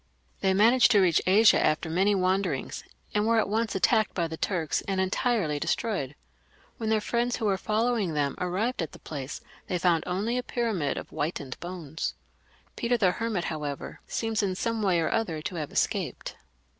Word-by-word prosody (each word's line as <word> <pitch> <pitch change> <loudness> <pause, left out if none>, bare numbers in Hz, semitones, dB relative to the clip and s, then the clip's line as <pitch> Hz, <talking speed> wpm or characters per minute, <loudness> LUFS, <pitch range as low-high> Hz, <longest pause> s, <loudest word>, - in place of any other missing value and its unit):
They 190 -1 +2
managed 235 +6 +6
to 205 - +6
reach 180 -4 +4
Asia 210 +4 +6
after 155 +2 +1
many 190 +5 +2
wanderings, 185 -6 -1 0.3
and 210 +1 +1
were 230 0 +3
at 220 - +2
once 220 +1 -1
attacked 215 +2 +2
by 170 -2 0
the 160 - -5
Turks 165 -2 -1
and 195 -1 0
entirely 190 -5 0
de - - -4
stroyed. 185 - -1 0.6
When 220 -1 -2
their 220 -1 +3
friends 240 +3 0
who 225 - -3
were 200 -2 +3
following 215 -3 0
them 145 -2 +1
arrived 190 +6 -1
at 165 - -4
the - - -10
place^ 140 -2 -6 0.3
they 180 - 0
found 170 -2 +2
only 210 +7 0
a - - -1
pyramid 225 - -1
of - - -6
whitened 145 -4 -4
bones. 170 -3 -5 0.6
Peter 245 +1 +1
the 190 -5 +3
Hermit, 220 -3 -2
however, 150 -4 -5
seems 225 -1 -1
in 190 -2 -1
some 230 +3 -1
way 185 -4 +2
or 165 - 0
other 185 -9 -1
to 180 - -4
have 150 -3 -4
escaped. - - -1
190 Hz, 185 wpm, -27 LUFS, 165-225 Hz, 0.6 s, managed